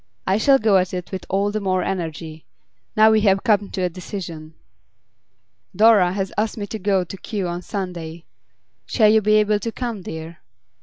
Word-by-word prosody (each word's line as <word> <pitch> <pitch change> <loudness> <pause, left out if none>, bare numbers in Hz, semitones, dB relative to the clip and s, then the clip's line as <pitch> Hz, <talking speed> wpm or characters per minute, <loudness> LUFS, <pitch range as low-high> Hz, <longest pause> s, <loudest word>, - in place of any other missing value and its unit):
I 190 +3 +1
shall 270 +4 +5
go 215 -5 +3
at 185 0 0
it 180 0 -6
with 190 -2 -6
all 200 +2 0
the 215 - -2
more 185 -2 0
energy, 160 -4 -5 0.5
now 220 0 +7
we 220 -1 +3
have 195 -2 +2
come 210 -4 +2
to 185 - -3
a - - +2
decision.' 165 -3 -8 1.2
'Dora 210 -5 +5
has 195 -1 -3
asked 215 +1 -1
me 205 - -3
to 220 +2 -6
go 195 -1 +1
to 185 +2 -9
Kew 195 -1 -4
on 175 0 -4
Sunday. 170 -4 -6 0.6
Shall 215 -2 +4
you 220 0 +4
be 215 +1 +3
able 210 -1 +3
to 230 +3 -4
come, 235 -4 -5
dear? 160 -1 -8
195 Hz, 190 wpm, -21 LUFS, 180-215 Hz, 1.2 s, now